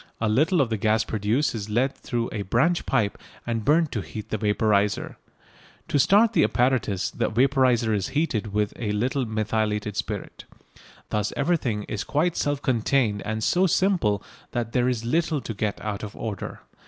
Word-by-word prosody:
A 115 - 0
little 155 - +3
of 120 -4 0
the 110 - 0
gas 110 +2 +2
produced 110 +7 0
is 105 -2 -5
led 125 +5 +1
through 120 -1 -3
a 105 - -3
branch 130 - +1
pipe 110 -7 0 0.3
and 115 -2 -2
burnt 155 +3 +3
to 110 - -2
heat 95 +6 -8
the 110 - -1
vaporiser. 105 -1 +1 0.7
To 145 - +2
start 210 - +5
the - - +4
apparatus 120 -6 +1
the - - -1
vaporiser 125 -2 +3
is 100 -3 0
heated 115 -10 0
with 105 0 0
a 105 -3 -1
little 125 +4 0
methylated 110 -1 -1
spirit. - - -5 0.6
Thus 105 -1 -1
everything 135 -9 0
is 105 +1 -4
quite 160 +4 0
self 145 -1 -1
contained 115 -4 +1
and 110 +1 -2
so 185 +9 +3
simple 165 - +1 0.3
that 120 -2 -2
there 125 +1 +2
is 115 -2 -2
little 160 +3 +1
to 115 - -5
get 105 0 -2
out 105 -2 -3
of 105 -1 -7
order. 105 -4 -5
115 Hz, 175 wpm, -25 LUFS, 105-135 Hz, 0.7 s, start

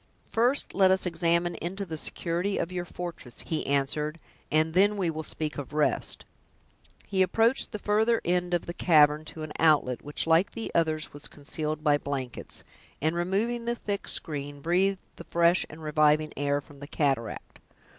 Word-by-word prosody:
"First 245 +5 +1
let 190 -1 +5
us 190 0 +3
examine 170 0 +1
into 195 +4 -3
the 165 -3 -5
security 175 +5 -1
of 165 - -2
your 180 -1 -3
fortress," 170 -9 -7
he 160 - -3
answered, 150 +3 0 0.3
"and 155 +1 +2
then 205 +3 +4
we 180 -4 0
will 160 0 -4
speak 155 -1 -4
of 145 0 -7
rest." 150 -1 +2 0.8
He 190 -2 0
approached 225 +7 +2
the 215 - -4
further 220 +3 +2
end 180 0 +1
of 175 - -2
the 170 - -5
cavern, 150 -3 +4
to 155 0 -7
an 155 - -6
outlet, 150 -6 +3
which, 145 +1 -3
like 165 +3 +3
the 230 - -5
others, 155 -2 0
was 145 0 -5
concealed 155 +1 -4
by 145 -2 +3
blankets; 135 -4 -3 0.4
and 160 +3 0
removing 210 +7 -1
the 235 0 0
thick 205 -3 -4
screen, 145 -2 -4
breathed 185 +5 +1
the - - -8
fresh 170 +1 +3
and 155 +1 -11
reviving 155 0 +3
air 145 0 0
from 140 0 -16
the 145 - -8
cataract. 135 -7 -2
165 Hz, 175 wpm, -28 LUFS, 150-185 Hz, 0.8 s, let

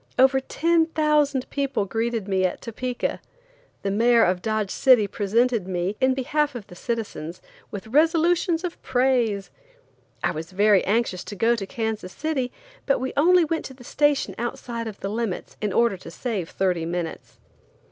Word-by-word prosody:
Over 265 +1 +5
ten 325 +4 +1
thousand 300 -4 +1
people 275 -7 -1
greeted 225 0 -2
me 190 -1 +1
at 185 - 0
Topeka. 245 +2 -3 0.6
The 200 - 0
mayor 230 +3 +4
of 180 0 +1
Dodge 215 -2 -1
City 250 -5 +5
presented 215 +1 +1
me, 185 +2 -2
in 260 0 +3
behalf 290 +2 0
of 230 -5 -6
the - - -14
citizens, 195 -6 -4 0.3
with 200 -3 -7
resolutions 330 - +2
of 355 -2 -5
praise. 245 -6 +1 0.7
I - - +2
was 165 +3 -7
very 205 0 +4
anxious 205 -4 0
to 205 - -7
go 230 +4 +3
to 200 -4 -5
Kansas 220 -4 -3
City, 280 -5 -2 0.4
but 275 - +3
we 260 +1 -3
only 350 +3 +5
went 320 +1 -2
to 265 - -8
the 250 - -14
station 290 +3 +1
outside 235 -1 -4
of 210 -2 -8
the 195 - -3
limits, 220 -3 -3
in 210 -2 -1
order 230 -1 +2
to 175 - -11
save 195 -2 -4
thirty 180 -4 0
minutes. 170 -1 -5
235 Hz, 165 wpm, -24 LUFS, 200-265 Hz, 0.7 s, Over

